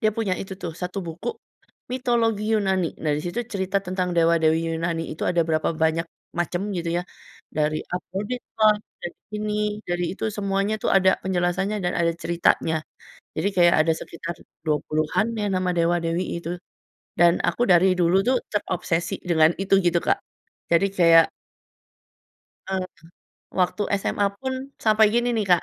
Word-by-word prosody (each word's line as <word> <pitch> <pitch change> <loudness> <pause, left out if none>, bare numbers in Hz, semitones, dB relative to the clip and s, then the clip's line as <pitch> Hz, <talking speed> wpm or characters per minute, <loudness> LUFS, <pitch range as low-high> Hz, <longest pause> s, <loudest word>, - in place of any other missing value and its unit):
dia 215 -3 +3
punya 210 -5 0
itu 195 0 -6
tuh 175 -4 -5
1 180 +3 -5
buku, 165 - -4 0.6
mitologi 235 -4 +1
Yunani 190 -5 +1
nah 155 - +1
disitu 175 +9 -3
cerita 195 0 0
tentang 185 0 -1
dewa-dewi 165 -1 +4 0.2
Yunani 165 0 -1
itu 155 - -8
ada 175 - +2
berapa 155 0 +1
banyak 160 +1 +1 0.3
macam 175 +2 -1
gitu 170 -1 -2
ya - - -5 0.5
dari 155 0 0
Aphrodite 200 +7 -4 0.2
lah 215 -1 +6 0.2
dari 175 - -6 0.2
ini, 210 0 -2 0.3
dari 175 0 0
itu - - -5
semuanya 200 +1 0
tuh - - +1
ada 190 -1 +5
penjelasannya 190 +3 0
dan 175 - +1
ada 170 -1 +2
ceritanya. 170 -1 +2 0.6
Jadi 200 - +1
kayak 175 -1 +6
ada 165 - +3
sekitar 165 +1 -6 0.3
20-an 155 +5 0
ya 210 - 0
nama 185 -1 0
dewa-dewi 170 +1 +1 0.2
itu. 170 - -4 0.7
Dan 170 0 +5
aku 240 - +1
dari 180 +2 +6
dulu 175 +1 +4
tuh 255 0 +4
terobsesi 175 -4 -1
dengan 160 -2 +4
itu 195 0 +3
gitu 175 0 +3
Kak. - - +2 0.5
Jadi 170 +4 +4
kayak 165 -2 +6 1.4
Mhm. 190 -1 -1 0.8
Waktu 180 +3 +1 0.2
SMA 200 +1 0
pun 260 0 -2 0.3
sampai 215 0 +5
gini 240 +1 +2
nih 215 - +1
Kak, 175 - +4
180 Hz, 150 wpm, -24 LUFS, 165-200 Hz, 1.4 s, lah